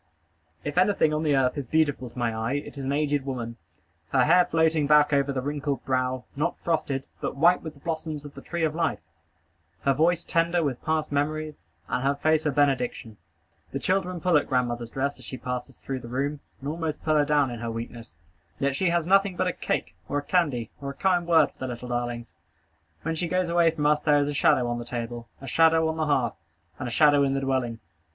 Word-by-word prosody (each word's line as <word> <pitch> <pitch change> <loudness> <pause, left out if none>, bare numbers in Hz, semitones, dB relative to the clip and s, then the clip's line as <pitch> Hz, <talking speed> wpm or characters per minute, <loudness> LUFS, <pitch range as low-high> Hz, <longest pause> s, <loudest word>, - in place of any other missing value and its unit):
If 145 +4 0
anything 185 -5 +3
on 150 - 0
the 150 -3 +2
earth 130 +1 +2
is 135 - -6
beautiful 145 -4 +1
to 115 - -18
my 115 -2 0
eye, 110 +3 -1
it 145 +1 -4
is 140 - -6
an 135 - -1
aged 145 -1 +1
woman; 120 -4 -5 0.5
her - - +3
hair 180 +3 +5
floating 160 -2 +2
back 150 0 +5
over 140 0 +2
the 130 -2 -2
wrinkled 145 -1 -2
brow, 130 -1 0
not 155 +5 -1
frosted, 145 -5 0 0.2
but - - -3
white 170 +6 +4
with 160 -2 -7
the 140 - -19
blossoms 155 -2 -4
of 145 - -9
the 140 - -10
tree 170 +2 -3
of 155 -1 +1
life; 165 -1 0 0.8
her 140 - +3
voice 170 +4 +2
tender 170 +1 +1
with 135 -5 -2
past 155 -2 0
memories, 155 +2 -1 0.3
and 125 - -1
her 140 +1 +2
face 155 +2 +2
a - - +2
benediction. 130 -6 0 0.6
The - - -1
children 185 +3 0
pull 175 -1 +3
at 145 - 0
grandmother's 120 -3 -1
dress 140 +3 -2
as - - -12
she 130 - -6
passes 125 0 -5
through 135 -1 -5
the 120 - -10
room, 140 +4 -2 0.2
and 140 - -3
almost 160 -1 -3
pull 155 -1 +2
her 150 - +5
down 145 -3 +2
in 120 - -6
her 115 0 -3
weakness; 115 -5 -7 0.4
yet 140 -1 0
she 185 +4 +1
has 170 -1 +1
nothing 195 +1 +3
but - - 0
a - - 0
cake, - - -2 0.2
or 145 - 0
a 145 - -2
candy, 145 -10 0
or 140 - -4
a - - -5
kind 180 -1 +1
word 160 -4 +5
for - - -35
the 130 - -3
little 125 0 -6
darlings. 120 -1 -3 0.7
When 165 - -1
she 170 +2 -2
goes 180 +1 0
away 170 -1 +4
from 155 -2 -2
us 150 0 +3
there 150 -1 +4
is 145 0 +2
a 145 - -2
shadow 130 -3 +3
on 120 0 -2
the - - -5
table, 120 -1 -5
a 135 - -10
shadow 160 +4 +4
on 160 0 -2
the 155 -1 0
hearth, 140 -4 +1 0.5
and 130 - -3
a - - -4
shadow 145 +2 +5
in 135 -1 +2
the 135 - -1
dwelling. 130 -4 -1
145 Hz, 230 wpm, -26 LUFS, 130-160 Hz, 0.8 s, hair